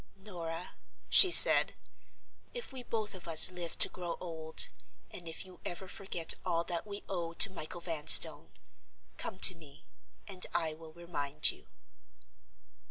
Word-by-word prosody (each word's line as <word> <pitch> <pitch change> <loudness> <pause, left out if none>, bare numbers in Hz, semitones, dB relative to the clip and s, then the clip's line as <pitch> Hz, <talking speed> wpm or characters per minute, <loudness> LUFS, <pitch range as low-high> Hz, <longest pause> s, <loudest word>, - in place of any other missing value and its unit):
"Norah," 175 -4 -11 0.3
she 375 - +6
said, - - +7 0.8
"if 480 - -9
we 260 - -9
both 220 -3 -7
of 185 -3 -12
us 165 +2 +6
live 175 -2 -9
to - - +4
grow 175 -2 -10
old, 160 -2 -1 0.4
and 175 - -12
if 160 - -11
you 185 -2 -19
ever 180 +2 -9
forget 180 -4 -6
all 170 -2 -4
that 170 +3 -7
we 205 0 -11
owe 170 -3 -8
to 195 +4 +2
Michael 175 -1 -10
Vanstone—come 165 +2 0
to 185 - +7
me, 155 -4 -20 0.4
and 190 -3 -4
I 160 -2 -3
will 160 0 -16
remind 155 -4 -3
you." - - -20
175 Hz, 145 wpm, -28 LUFS, 165-190 Hz, 0.8 s, said